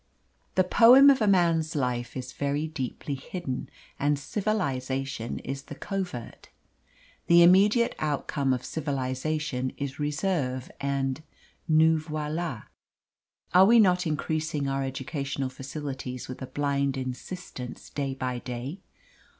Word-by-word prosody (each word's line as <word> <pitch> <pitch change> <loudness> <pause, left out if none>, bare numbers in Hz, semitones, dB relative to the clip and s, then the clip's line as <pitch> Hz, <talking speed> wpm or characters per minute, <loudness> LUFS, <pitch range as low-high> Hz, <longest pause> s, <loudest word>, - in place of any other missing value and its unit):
The 185 - +5
poem 250 +8 +8
of 265 - +1
a 215 - +3
man's 165 -5 +3
life 125 -3 -2
is 130 0 -6
very 145 +2 -1
deeply 145 -1 -4
hidden, 140 - -5 0.3
and 145 +1 +2
civilisation 135 - -2
is 135 0 -5
the - - -8
covert. 180 - -5 0.8
The 170 0 +7
immediate 205 +7 +5
outcome 145 -2 -1
of 130 -1 -1
civilisation 135 -2 -2
is 140 0 -5
reserve 145 -4 -1
and 140 0 -1 0.5
nous 160 0 +4
voila. 155 -4 -3 0.9
Are 185 +1 +8
we 235 +2 +7
not 180 -4 +4
increasing 155 -1 -1
our 135 0 -1
educational 135 0 -3
facilities 135 -2 -6
with 130 - -8
a 130 - -5
blind 140 -1 0
insistence 130 0 -7
day 135 -2 -2
by 125 -2 -3
day? 125 +8 -6
140 Hz, 120 wpm, -27 LUFS, 130-165 Hz, 0.9 s, poem